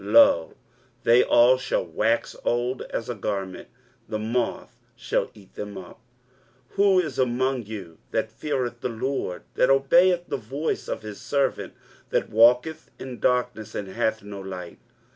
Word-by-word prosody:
lo, 100 -6 +5 0.5
they 120 +1 +6
all 125 +2 +5
shall 125 - -1
wax 110 +8 0
old 120 +2 0
as 115 - -3
a 120 - -2
garment; 100 -3 -4 0.4
the 110 - -1
moth 115 +2 -2 0.2
shall 115 -1 -1
eat 100 -3 -17
them 105 -1 -6
up. 95 +3 -10 0.7
23:050:010 - - -26
Who 195 -2 +5
is 155 -7 -5
among 130 0 +1
you 95 -7 -8
that 110 0 -1
feareth 125 -2 -3
the 125 - -1
LORD, 115 -5 -3
that 125 - +3
obeyeth 175 +6 +4
the - - -2
voice 135 +7 -3
of - - -4
his 105 -2 -8
servant, 140 -2 -1 0.3
that - - 0
walketh 125 +8 +4
in 130 -2 -8
darkness, 125 -4 0
and 100 -2 -4
hath 110 +3 -1
no 100 -1 -8
light? 90 -2 -8
120 Hz, 155 wpm, -25 LUFS, 105-130 Hz, 0.7 s, they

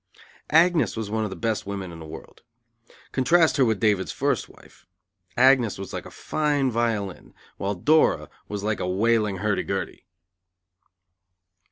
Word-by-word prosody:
Agnes 165 -3 +3
was 110 -2 -4
one 110 0 0
of 105 - -2
the 95 - -7
best 110 +3 -2
women 100 -3 -5
in 85 - -10
the 80 - -9
world. 75 - -11 0.7
Contrast 160 +6 +3
her 135 - +4
with 110 -4 0
David's 105 -3 +1
first - - -1
wife. - - -20 0.5
Agnes 125 -3 +4
was 95 -1 -8
like - - -5
a - - -10
fine 145 -4 -1
violin, 110 -5 -2 0.2
while 100 +1 -2
Dora 155 - +3 0.2
was 105 -1 -5
like 105 0 -1
a 90 - -2
wailing 105 +1 +1
hurdy 105 +1 0
gurdy. 95 0 -5
110 Hz, 155 wpm, -24 LUFS, 100-130 Hz, 0.7 s, her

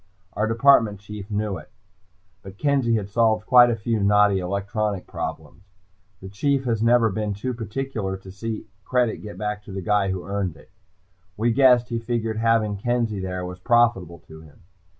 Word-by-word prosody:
Our 105 +2 0
Department 115 -3 +4
Chief 105 0 -9
knew 105 -2 -2
it, 75 - -15 0.7
but 95 0 -12
Kenzie 135 -4 +1
had 105 -3 -2
solved 110 0 +1
quite 125 -1 +7
a 120 - +1
few 115 +1 -2
knotty 105 -1 +4
electronics 100 +2 -2
problems. 80 +2 -7 0.6
The 95 - -8
Chief 135 +7 0 0.2
never 115 0 +4
has - - -5
been 105 0 -2
too 125 +6 -3
particular 115 -3 -4
to 95 0 -12
see 110 +3 -5 0.2
credit 125 -1 0
get 105 -4 -10
back 105 +1 -4
to - - -10
the 95 -1 -5
guy 100 +1 +1
who 95 -2 -4
earned 95 -5 -3
it. - - -19 0.7
We 115 +3 +1
guessed 125 -1 +4
he 115 -1 -2
figured 115 -1 -2
having 110 -2 +1
Kenzie 115 -1 -1
there 90 -1 -4
was 90 0 -8
profitable 115 -6 +2
to 80 0 -12
him. 80 -2 -18
105 Hz, 175 wpm, -23 LUFS, 95-115 Hz, 0.7 s, quite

